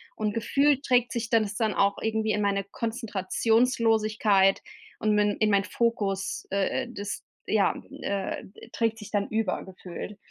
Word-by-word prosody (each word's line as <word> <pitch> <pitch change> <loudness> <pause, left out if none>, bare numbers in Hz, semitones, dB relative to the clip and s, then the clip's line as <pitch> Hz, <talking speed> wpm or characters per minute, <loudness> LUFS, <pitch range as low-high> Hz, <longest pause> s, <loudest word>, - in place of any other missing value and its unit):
Und 210 -1 -1
Gefühl 275 +5 +2
trägt 245 -3 +2
sich 230 -1 -3
dann 225 -2 +4
das 205 - -4
dann 220 -2 0
auch 200 0 +2
irgendwie 220 -1 0
in 210 - 0
meine 200 -1 +1
Konzentrationslosigkeit 220 -1 +2 0.4
und 215 0 +2
min 210 -1 +2
in 215 -1 +2
mein 200 -1 +4
Fokus, 200 -2 -1
äh, 195 -1 0
äh, - - -8
das 205 -3 -5 0.2
ja, - - +2 0.3
äh, 195 -1 -2
ed 230 - -14
trägt 225 -1 0
sich 210 - -10
dann 205 -1 0
über 220 -4 -1
gefühlt. 190 +2 -8
215 Hz, 165 wpm, -27 LUFS, 200-230 Hz, 0.4 s, dann